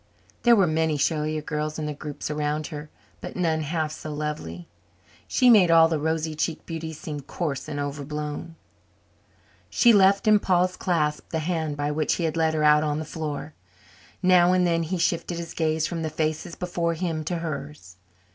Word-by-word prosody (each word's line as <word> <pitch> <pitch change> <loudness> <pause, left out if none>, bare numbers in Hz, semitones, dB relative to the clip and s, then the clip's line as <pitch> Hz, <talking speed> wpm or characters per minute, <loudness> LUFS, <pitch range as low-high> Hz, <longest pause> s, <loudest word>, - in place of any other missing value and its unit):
There 240 -1 +6
were 195 -4 +4
many 160 -1 +1
showier 155 +1 0
girls 150 0 -3
in 155 - -3
the 150 - -3
groups 145 +1 -6
around 150 0 -1
her, 150 0 -7 0.3
but - - -8
none 160 -3 0
half 155 0 -2
so 155 0 -7
lovely. 145 - -5 0.6
She 255 - +3
made 210 -7 +7
all 165 -1 +7
the 160 -2 -1
rosy 160 +1 -1
cheeked 155 +1 -3
beauties 160 -1 -6
seem 155 -5 -5
coarse 140 0 -4
and 145 - -4
over 145 0 -3
blown. 150 +2 -5 1.1
She 240 -1 +5
left 200 +1 +4
in 215 -1 +6
Paul's 185 -1 +2
clasp 155 -6 -1
the 160 - -2
hand 160 -2 -2
by 145 0 -1
which 150 0 0
he 175 - -3
had 160 -1 -1
led 160 -1 +1
her 155 - 0
out 150 0 +6
on 150 -1 -1
the 155 - -4
floor. 155 -1 -5 0.7
Now 180 -1 +5
and 180 -1 +3
then 165 -1 +2
he 170 +3 -2
shifted 170 0 -1
his 170 -1 -6
gaze 160 -1 0
from 170 -2 -3
the 160 - -2
faces 155 +2 -2
before 170 -2 -2
him 165 -2 -2
to 175 - -2
hers. 140 - -6
160 Hz, 190 wpm, -25 LUFS, 150-170 Hz, 1.1 s, made